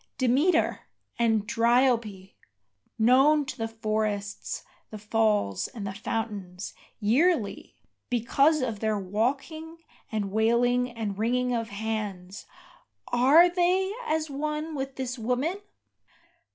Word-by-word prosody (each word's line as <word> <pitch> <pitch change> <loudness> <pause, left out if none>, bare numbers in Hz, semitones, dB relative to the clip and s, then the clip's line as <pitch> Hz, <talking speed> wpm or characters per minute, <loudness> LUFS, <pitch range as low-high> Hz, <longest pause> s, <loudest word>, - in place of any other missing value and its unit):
Demeter, 285 +7 +2 0.3
and 225 -3 +2
Dryope, 230 -5 +1 0.6
known 270 +6 +5
to 260 - -6
the 225 -2 -3
forests, 215 -2 -3 0.3
the 215 - -8
falls, 210 - 0
and 220 -6 -8
the 195 - -4
fountains, 205 -4 -4 0.3
Yearly, 235 - +1 0.3
because 275 +6 +2
of 225 -5 -3
their 220 -1 0
walking 270 - -2 0.3
and 205 -3 -2
wailing 240 +3 +2
and 215 -4 -5
wringing 250 +2 +1
of 230 -1 -2
hands, 205 -3 -5 0.6
Are 275 +8 +6
they 365 +2 +1
as 315 0 0
one 300 +2 -3
with 270 -2 -4
this 260 -1 -4
woman? 260 - -1
235 Hz, 110 wpm, -27 LUFS, 215-275 Hz, 0.6 s, Are